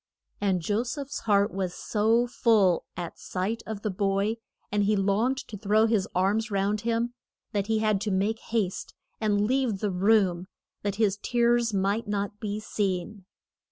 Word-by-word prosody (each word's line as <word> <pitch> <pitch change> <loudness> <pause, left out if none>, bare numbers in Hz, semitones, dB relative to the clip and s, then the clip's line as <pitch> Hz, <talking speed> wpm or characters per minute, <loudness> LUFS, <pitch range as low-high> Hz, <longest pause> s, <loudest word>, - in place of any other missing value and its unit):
And 190 -3 +1
Jo 210 +5 +1
seph's 275 +3 -4
heart 200 +1 +3
was 185 -2 -2
so 225 +3 +2
full 215 -7 +3
at 175 -2 -6
sight 195 +5 -3
of 215 -2 -5
the 215 - 0
boy, 200 +3 0 0.3
and 205 0 +2
he 210 +1 +3
longed 210 +7 +1
so - - -17
to 210 - -6
throw 215 +2 +3
his 220 -4 +1
arms 205 +5 +1
round 200 +1 0
him, 235 +1 0 0.4
that 205 -3 -1
he 220 -1 +2
had 215 -2 +1
to 215 - -1
make 205 +3 0
haste 210 -5 -2 0.2
and 210 -2 +2
leave 255 -3 +1
the 205 +1 -1
room 185 -2 +2 0.3
that 205 -1 -2
his 205 -2 +2
tears 240 -1 +2
might 200 +3 0
not 205 0 -2
be 210 -1 -3
seen. 195 -1 -3
210 Hz, 170 wpm, -27 LUFS, 195-225 Hz, 0.4 s, heart